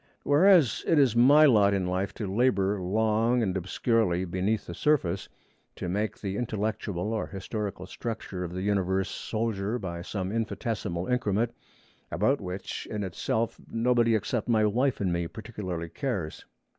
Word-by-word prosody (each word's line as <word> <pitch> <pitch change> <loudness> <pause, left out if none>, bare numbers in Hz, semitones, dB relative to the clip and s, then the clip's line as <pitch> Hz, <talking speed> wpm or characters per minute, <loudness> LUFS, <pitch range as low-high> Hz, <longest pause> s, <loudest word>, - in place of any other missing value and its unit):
Whereas 155 - +5
it 165 - +4
is 135 -6 +4
my 140 +6 +7
lot 105 -7 +5
in 95 -2 0
life 95 +2 -1
to 110 - -4
labor 100 -2 +1
long 110 +5 +2
and 95 -3 -1
obscurely 95 0 +1
beneath 95 +4 -1
the 85 - -7
surface, 100 - 0 0.5
to - - -5
make 105 +4 -2
the 100 -1 -3
intellectual 105 -3 -2
or 110 - -2
historical 100 -1 -5
structure 105 -3 -5
of 85 - -5
the 95 +1 -4
universe 95 -1 0
solider 110 -1 -2
by 85 -6 -5
some 95 +1 -4
infinitesimal 110 -5 -2
increment, 120 -1 0 0.6
about 110 - +1
which 90 +1 -5
in 105 -1 -3
itself 110 +5 -2
nobody 115 0 +2
except 110 +2 -2
my 110 -2 +4
wife 125 +6 +1
and 90 -3 +1
me 85 0 -1
particularly 95 -6 -6
cares. 100 - -4
105 Hz, 150 wpm, -28 LUFS, 95-115 Hz, 0.6 s, my